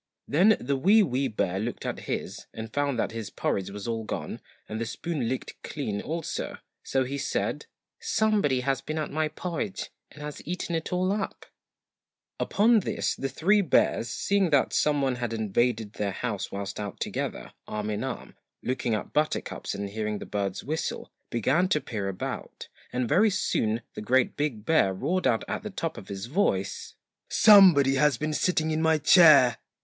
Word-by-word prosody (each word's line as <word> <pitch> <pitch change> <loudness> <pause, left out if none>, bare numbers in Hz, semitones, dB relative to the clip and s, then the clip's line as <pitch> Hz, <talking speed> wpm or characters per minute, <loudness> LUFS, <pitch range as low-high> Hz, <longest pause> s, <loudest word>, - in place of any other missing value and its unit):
Then 195 +9 +4
the 140 +3 -1
WEE 200 +10 +5
WEE 135 -4 0
BEAR 95 -5 -1
looked 115 +4 -4
at - - -3
his, - - -4
and 110 0 -7
found 145 -3 0
that - - 0
his 115 -3 -5
porridge 95 -1 -2
was 100 +1 -7
all 115 -1 -2
gone - - -5 0.3
and 110 +1 -4
the - - -1
spoon 145 -2 -3
licked 130 - -5
clean 105 -9 -4
also, 165 +1 -4 0.2
so 135 -1 0
he 140 +2 -4
said - - -2 0.3
SOMEBODY 215 - +1
HAS 135 +1 0
BEEN 155 - -4
AT 155 - -2
MY 155 +1 0
PORRIDGE 180 +5 -4 0.2
AND 150 - -11
HAS 150 0 -6
EATEN 170 -1 -2 1.6
Upon 225 +3 +4
this 190 - -1
the 135 - -3
three 195 - +3
bears, 120 - +2
seeing 195 +10 +1
that 140 -3 +2
some 145 -2 +2
one 130 -2 0
had 120 -2 -3
invaded 110 0 0
their 100 -2 -2
house 105 -2 -3
whilst 100 0 -5
out 100 -2 -5
together - - -4
arm 105 0 -3
in 105 +2 -2
arm, 130 -1 -5 0.3
looking 125 -3 -1
at 105 - -5
buttercups 155 +1 -1
and 100 0 -3
hearing 105 0 -3
the - - -7
birds 100 -2 -3
whistle, 155 +4 -3 0.2
began 135 - +2
to 155 - +2
peer 105 -8 -4
about, 95 -2 -6 0.2
and 125 -1 -1
very 210 - +4
soon 115 - 0
the - - -6
GREAT 125 +4 +2
BIG 130 -8 -2
BEAR 125 -13 +3
roared 180 - 0
out 115 -3 +2
at - - -3
the 215 - -6
top 165 -5 -3
of 95 - -10
his 100 +1 -5
voice 120 - -1 0.3
'SOMEBODY 180 -11 +7
HAS 150 0 +3
BEEN 155 0 -2
SITTING 160 +1 +1
IN 155 0 0
MY 160 -1 +4
CHAIR!' 150 -6 +7
135 Hz, 175 wpm, -27 LUFS, 110-160 Hz, 1.6 s, SOMEBODY